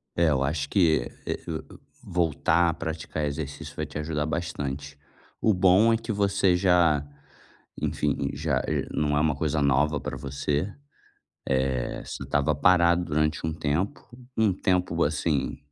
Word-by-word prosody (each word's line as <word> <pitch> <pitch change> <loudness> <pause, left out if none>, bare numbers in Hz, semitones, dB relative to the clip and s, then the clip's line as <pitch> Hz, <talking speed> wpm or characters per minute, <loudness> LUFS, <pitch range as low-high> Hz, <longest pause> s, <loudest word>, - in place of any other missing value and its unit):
É, 85 -1 +3
eu 70 -3 +2
acho 70 0 -1
que, 80 -8 +2 0.2
eh, - - -2
o - - -6
o - - -25 0.3
voltar 85 0 +2
a - - -3
praticar 80 -1 -4
exercício 70 -1 -5
vai - - -2
te - - -12
ajudar 75 -1 -2
bastante. 70 -4 -4 0.4
O 110 -3 +3
bom 95 +5 +5
é - - +4
que 115 +1 -7
você 100 -3 +2
já, 85 -6 +3 0.7
enfim, 70 - -1
já 70 -3 -1
eh, - - -1
não 75 -1 0
é 75 - +3
uma 75 -2 +2
coisa 80 0 0
nova 70 +2 +2
pra - - -5
você. 70 +6 -2 0.8
Eh, 65 -2 0
você - - -6
estava 75 +1 +1
parado 85 +2 +4
durante 75 0 0
um 80 - -1
tempo, 80 +5 -1 0.4
um 110 -3 +4
tempo, 90 -2 +1
assim, 75 -2 0
80 Hz, 155 wpm, -26 LUFS, 70-90 Hz, 0.8 s, bom